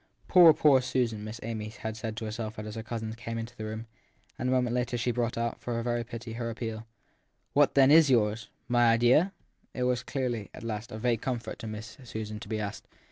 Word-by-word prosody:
Poor, 175 -3 +9
poor 145 -4 +5
Susan! 120 -4 -1
Miss 110 +2 -6
Amy 110 -1 -4
had 110 0 -6
said 110 -1 -5
to 115 - -4
herself 110 0 -5
as 105 0 -6
her 115 - -5
cousin 110 -1 -4
came 115 0 -5
into 115 +2 -6
the 110 - -6
room; 110 +1 -5 0.5
and 125 - 0
a - - +1
moment 125 -2 +2
later 125 0 0
she 120 +1 0
brought 120 -1 -1
out, 115 0 -2
for 120 -1 -2
very 120 0 0
pity, 115 0 -7
her 115 0 -3
appeal. 115 -1 -5 0.3
< - - -46
What 145 -1 +4
then 135 0 +6
is 160 -1 +7
yours? 115 -2 +2 0.2
My 120 -1 +4
idea? 120 +11 +4 0.4
It 125 - -1
was 125 -1 +1
clearly, 120 -7 -3
at - - -10
last, 115 +1 -4
a 110 - -5
vague 115 0 0
comfort 120 -4 -3
to 115 - -6
Miss 110 +1 -7
Susan 110 -3 -5
to 115 - -9
be 110 -1 -1
asked. 105 0 -5
115 Hz, 225 wpm, -29 LUFS, 110-125 Hz, 0.5 s, Poor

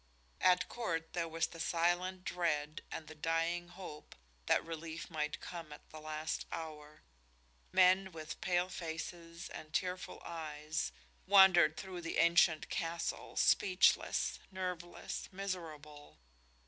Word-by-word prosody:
At 180 -1 +5
court 165 -9 -3
there 170 -1 0
was 165 0 0
the 165 - -10
silent 175 +3 +1
dread 155 -3 -1
and 160 - -5
the 155 - -8
dying 165 +2 0
hope 175 -4 -10 0.3
that - - +3
relief 165 0 -6
might 150 -1 -2
come 165 -3 -7
at 150 - -11
the 155 - -8
last 155 0 -3
hour. 155 -2 -7 0.7
Men, 185 +1 +5
with 160 -2 -7
pale 180 -3 +2
faces 170 0 -6
and 155 - -9
tearful 180 +2 -2
eyes, 155 -1 -3 0.4
wandered 185 -5 +7
through 185 -2 -6
the 165 - -3
ancient 170 -2 +5
castle, 165 +1 -3
speechless, 185 -1 +3
nerveless, 180 -2 -4
miserable. 160 -6 -6
165 Hz, 120 wpm, -35 LUFS, 155-180 Hz, 0.7 s, wandered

